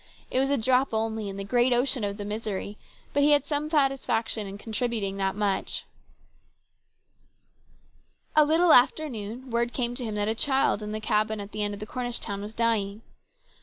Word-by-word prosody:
It 255 - +1
was 270 +1 +2
a 280 - +2
drop 255 +1 +2
only 220 -1 -1
in 195 - -7
the 195 - -4
great 245 +5 +2
ocean 245 0 +2
of 200 0 -2
the 205 - -5
misery, 210 -1 -4 0.4
but 285 - +2
he 295 +1 +5
had 290 -1 +3
some 295 +1 -1
satisfaction 265 -7 0
in 195 +1 -7
contributing 220 -2 -2
that 195 0 0
much. 205 -2 -1 2.5
A 305 - +7
little 320 +3 +4
after 310 +5 +5
noon 235 +2 -7
word 235 +1 0
came 240 -2 -1
to 245 - +1
him 220 -3 -3
that 205 0 0
the 220 - 0
child 265 -2 +1
in 210 0 -5
the 215 - -3
cabin 215 0 0
at 200 0 -7
the 215 - -4
end 205 -1 -2
of 215 - -7
Cornish 245 0 -3
town 200 0 -4
was 210 +2 -8
dying. 220 -2 0
225 Hz, 190 wpm, -27 LUFS, 210-255 Hz, 2.5 s, A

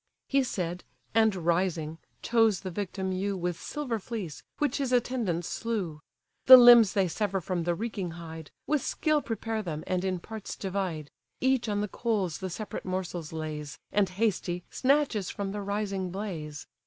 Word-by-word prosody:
He 275 0 +3
said, 180 -8 -3 0.3
and, 220 -2 +4
rising, 170 -2 0 0.2
chose 225 -4 +3
the 185 - -5
victim 190 0 -3
ewe 195 +1 -1
With 175 -1 -1
silver 260 -7 -3
fleece, 195 -8 -6 0.2
which 290 -3 0
his 275 -3 -1
attendants 230 -9 0
slew. 200 -10 -3 0.5
The 260 0 +13
limbs 240 -4 +9
they 195 -2 +2
sever 195 +2 -1
from 175 -1 -2
the 175 -1 +1
reeking 205 -3 -3
hide, 160 -2 -8 0.2
With 300 -2 +1
skill 305 +2 +1
prepare 225 -2 -3
them, 160 -6 -4
and 185 0 -1
in 190 -1 0
parts 220 +4 -7
divide: 185 -6 -3 0.3
Each 260 -3 +2
on 205 0 0
the 210 - -1
coals 200 -7 -1
the 190 -1 -4
separate 210 +4 -5
morsels 180 -3 -4
lays, 155 -2 -5
And, 200 -2 +2
hasty, 185 -3 -1
snatches 265 -8 +2
from 200 -1 -3
the 205 +1 -4
rising 200 -2 -2
blaze. 170 -7 -5
195 Hz, 165 wpm, -29 LUFS, 175-225 Hz, 0.5 s, The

